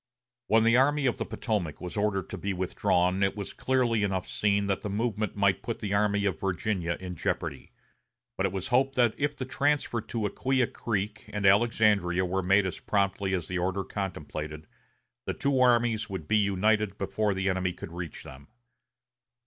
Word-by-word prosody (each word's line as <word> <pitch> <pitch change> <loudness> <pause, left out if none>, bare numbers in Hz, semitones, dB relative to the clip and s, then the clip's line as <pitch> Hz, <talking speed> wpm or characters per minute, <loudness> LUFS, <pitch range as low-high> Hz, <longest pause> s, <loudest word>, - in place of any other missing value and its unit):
When 110 0 +4
the 115 +1 +5
Army 145 +2 +3
of 125 - +1
the - - -3
Potomac 100 - -2
was 90 -1 -6
ordered 105 -2 0
to - - -4
be 100 0 -2
withdrawn 90 0 +1
it 95 +1 +1
was 100 - -5
clearly 125 -4 +1
enough 95 -3 -1
seen 100 -1 +1
that 100 -1 -1
the 105 - -4
movement 110 0 -1
might 100 -1 +2
put 115 - -4
the 100 -2 -3
Army 100 0 +2
of 95 -5 -1
Virginia 95 -2 -1
in 90 -1 -6
jeopardy; 85 - -3 0.6
but 95 - +1
it - - -5
was 95 -1 -4
hoped 135 +2 +2
that 120 -3 +3
if 145 +1 -1
the 130 - -4
transfer 140 -3 0
to 110 0 -3
Acquia 130 +4 +1
Creek 105 -3 -4
and 105 -1 -2
Alexandria 100 -3 +3
were 95 +2 -1
made 95 +2 +3
as 95 - -4
promptly 100 -1 0
as 85 -3 -4
the 90 -1 -2
order 95 +2 -1
contemplated, 75 -6 -5 0.6
the - - -2
two 140 -2 +1
armies 120 -3 +3
would 95 -6 -5
be 110 - +3
united 105 0 +1
before 105 +1 -1
the 95 +1 -1
enemy 95 -1 +1
could 90 - -9
reach 85 -1 -6
them. 70 +2 -12
100 Hz, 185 wpm, -28 LUFS, 95-110 Hz, 0.6 s, the